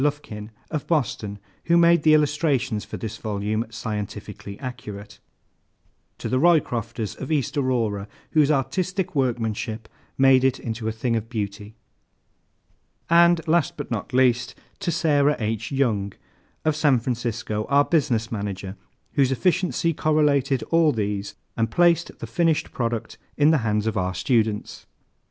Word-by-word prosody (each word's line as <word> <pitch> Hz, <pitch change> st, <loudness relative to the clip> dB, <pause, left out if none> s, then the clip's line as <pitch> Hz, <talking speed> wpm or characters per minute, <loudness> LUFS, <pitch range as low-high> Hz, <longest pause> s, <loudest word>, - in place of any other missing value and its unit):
LUFKIN, 125 Hz, -8 st, -3 dB, 0.2 s
of 155 Hz, -3 st, -3 dB
Boston, 115 Hz, -9 st, -1 dB, 0.3 s
who 170 Hz, 0 st, +4 dB
made 170 Hz, -1 st, +5 dB
the 155 Hz, 0 st, +6 dB
illustrations 140 Hz, -7 st, +1 dB
for -, -, -7 dB
this 110 Hz, -2 st, -5 dB
volume 110 Hz, +2 st, -2 dB
scientifically 105 Hz, -3 st, -6 dB
accurate. 105 Hz, -7 st, -8 dB, 1.0 s
To -, -, -5 dB
THE 130 Hz, -, +1 dB
ROYCROFTERS, 120 Hz, -, +1 dB
of 135 Hz, -, -5 dB
East 145 Hz, -5 st, 0 dB
Aurora, 115 Hz, -7 st, 0 dB, 0.2 s
whose 150 Hz, -3 st, +4 dB
artistic 175 Hz, +7 st, -1 dB
workmanship 115 Hz, -4 st, -2 dB, 0.3 s
made 135 Hz, -1 st, +5 dB
it 130 Hz, 0 st, +2 dB
into 110 Hz, -1 st, -4 dB
a -, -, +1 dB
thing 115 Hz, +2 st, -1 dB
of 115 Hz, 0 st, -3 dB
beauty. 105 Hz, -1 st, -5 dB, 1.4 s
And 170 Hz, 0 st, +5 dB
last 160 Hz, -3 st, +2 dB
but -, -, -6 dB
not 110 Hz, -3 st, -3 dB
least, 125 Hz, -1 st, +2 dB, 0.2 s
To 195 Hz, -4 st, -1 dB
SARAH 150 Hz, -3 st, +3 dB
H. 110 Hz, +2 st, -3 dB
YOUNG, 110 Hz, -8 st, 0 dB, 0.5 s
of 155 Hz, -1 st, +2 dB
San 150 Hz, -3 st, +3 dB
Francisco, 115 Hz, -3 st, -3 dB
our 140 Hz, +1 st, +4 dB
Business 120 Hz, -9 st, +1 dB
Manager, 100 Hz, -3 st, -4 dB, 0.4 s
whose 135 Hz, -2 st, +3 dB
efficiency 175 Hz, +3 st, +1 dB
correlated 145 Hz, -4 st, +2 dB
all 165 Hz, -2 st, +5 dB
these 105 Hz, -4 st, -3 dB, 0.2 s
and 115 Hz, 0 st, 0 dB
placed 170 Hz, +3 st, +2 dB
the -, -, -6 dB
finished 165 Hz, -3 st, 0 dB
product 115 Hz, -2 st, -3 dB, 0.2 s
in 150 Hz, +2 st, +5 dB
the 160 Hz, -, +3 dB
hands 105 Hz, -2 st, 0 dB
of 110 Hz, -, -1 dB
our 95 Hz, 0 st, -1 dB
students. 110 Hz, -, -1 dB
125 Hz, 140 wpm, -24 LUFS, 110-150 Hz, 1.4 s, the